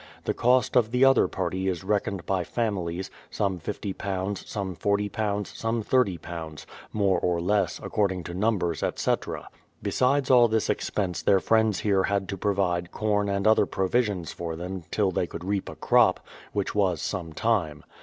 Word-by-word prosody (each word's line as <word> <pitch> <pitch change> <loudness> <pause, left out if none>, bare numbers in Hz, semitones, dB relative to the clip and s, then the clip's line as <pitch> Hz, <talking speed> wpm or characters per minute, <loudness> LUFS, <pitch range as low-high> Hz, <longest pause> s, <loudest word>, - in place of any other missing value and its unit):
The - - 0
cost 125 0 +2
of 120 -3 +4
the 125 +3 +4
other 135 -1 +5
party 95 +1 -2
is 90 -2 -2
reckoned 100 -2 -1
by 95 -2 0
families, 95 -4 -2 0.2
some 95 -3 -1
£50, 100 +1 -4
some 95 -4 -4
£40, 105 +1 -1
some 115 0 -1
£30, 85 - -1
— - - -19
more 100 -4 +2
or 85 -1 0
less, 95 0 +1
according 95 -4 0
to 85 - -7
numbers, 90 -5 0
etc. - - -1 0.4
Besides 135 +1 +2
all 120 -2 +7
this 110 -1 +1
expense 95 -4 -2
their 100 -1 +4
friends 110 -2 +2
here 100 -2 +2
had 100 -1 -1
to 100 - -2
provide 90 -4 0
corn 105 -1 0
and 100 0 -1
other 110 0 +5
provisions 95 -3 0
for 85 -1 -5
them 90 +1 -6
till 100 -3 +1
they 90 - -1
could 85 - -8
reap 100 0 -1
a - - -8
crop, - - +3 0.3
which 100 -2 -2
was 95 -6 +1
some 85 -3 -4
time. 80 -7 0
100 Hz, 165 wpm, -26 LUFS, 90-105 Hz, 0.4 s, all